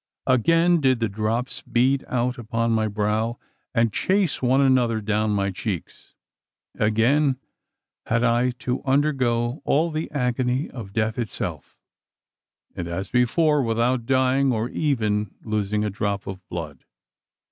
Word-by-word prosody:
Again 165 +7 +3
did 130 -3 +3
the 115 - +1
drops 110 +5 -2
bead 130 +3 +1
out 125 +1 -1
upon 115 0 -1
my 110 -1 +2
brow, 105 +3 -1 0.3
and 115 -3 +1
chase 190 -4 +1
one 130 +1 +3
another 125 -4 +3
down 105 0 0
my 100 -1 0
cheeks. 95 -2 -6 0.6
Again 125 +6 +2 0.7
had 115 +1 +1
I 120 +1 +3 0.2
to 125 0 -1
undergo 130 -3 +1
all 160 +4 +2
the 155 +1 -3
agony 125 0 -1
of 110 -7 -8
death 110 +2 -1
itself 115 -3 -4 1.0
and, 85 - -4
as 95 +3 -4
before, 150 +5 +3
without 120 0 0
dying, 130 +1 +3
or 115 0 -1
even 105 -9 -1
losing 105 -1 -1
a 105 - -2
drop 100 0 -2
of 95 - -5
my 95 - -32
blood! 75 -6 -6
120 Hz, 135 wpm, -24 LUFS, 105-130 Hz, 1.0 s, Again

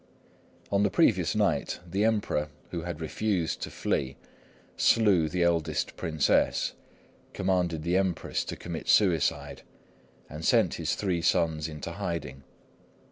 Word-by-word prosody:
On 100 0 +3
the 100 - +3
previous 85 - +2
night, - - 0
the 95 +4 0
Emperor, 105 -9 0 0.2
who 85 - -3
had 85 -2 -5
refused 90 +1 -1
to - - -4
flee, 65 0 -2 0.6
slew 95 -8 +3
the 90 +1 0
eldest 85 -3 0
Princess, 80 -3 +1 0.6
commanded 90 -4 0
the 85 +2 +1
Empress 95 -3 -1
to - - -5
commit 85 -2 -7
suicide, 90 -8 +2 0.7
and 75 +2 -8
sent - - +3
his - - 0
three 90 -4 -1
sons 80 -3 +1
into 75 -2 -6
hiding. 70 -6 -4
85 Hz, 130 wpm, -28 LUFS, 80-95 Hz, 0.7 s, On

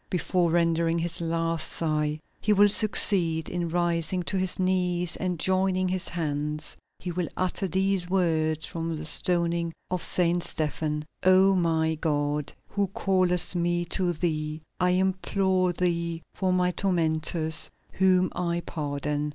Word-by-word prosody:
Before 180 0 +1
rendering 165 0 +2
his 170 0 0
last 165 0 -1
sigh, 155 -1 -1 0.2
he 210 - +2
will 205 0 +5
succeed 180 -6 +3
in 175 -1 -3
rising 175 +1 0
to 195 - -3
his 185 -1 -1
knees, 180 -2 0
and, 180 -2 -2
joining 185 0 +1
his 185 -1 -1
hands, 150 -2 -3 0.2
he 180 - -5
will 175 -1 -2
utter 185 +1 -1
these 190 0 0
words 160 -4 +1
from 165 0 -4
the 155 - -6
stoning 170 0 0 0.2
of 180 -1 -1
Saint 175 -1 +2
Stephen: 150 -2 -2 0.2
"O 185 +1 +5
my 160 -3 +1
God, 145 -2 -1 0.2
who 200 -1 0
callest 185 -2 +1
me 175 0 0
to 180 -2 +2
Thee, 155 -1 -2 0.2
I 180 0 +3
implore 190 0 +1
Thee 170 -2 -1
for 185 -1 0
my 180 0 +2
tormentors, 160 -3 0 0.2
whom 185 -1 +3
I 170 -1 -1
pardon." 145 0 -3
175 Hz, 140 wpm, -26 LUFS, 160-185 Hz, 0.2 s, will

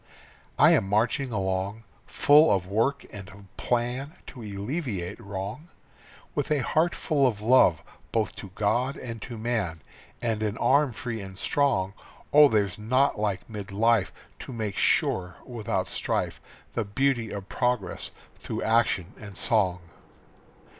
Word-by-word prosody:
I - - +7
am 95 - +3
marching 120 +6 +1
along, 95 +1 -2 0.2
full 150 +2 +5
of 95 -3 +1
work 115 +9 0
and 100 -3 -9
of 100 -1 -16
plan 125 +5 -1
To 125 - -10
alleviate 105 - -4
wrong. 100 - -6 0.6
With 145 - -2
a 150 -4 +1
heart 165 +6 +1
full 140 -4 +2
of 110 -5 -2
love 105 -8 +4 0.3
both 110 -2 0
to 100 - -8
God 125 +6 +1
and 115 -3 -7
to 120 0 -7
man, 110 -8 -2 0.4
And 115 -3 -1
an 105 0 -1
arm 140 0 +3
free 115 -1 -5
and 95 -1 -9
strong. 95 -8 +1 0.4
Oh, 150 0 +9
there's 105 -6 0
naught 130 +3 +2
like 100 -3 -1
mid 105 -3 -7
life 110 0 +2 0.3
To - - -8
make 110 -5 -3
sure 90 -1 +1
without 120 -5 -2
strife - - -2 0.3
The 115 - 0
beauty 120 +2 0
of 100 -2 -6
progress 125 -4 -1 0.3
through - - -4
action 110 -5 +1
and 100 -3 -10
song. 95 -7 +1
110 Hz, 145 wpm, -27 LUFS, 100-125 Hz, 0.6 s, Oh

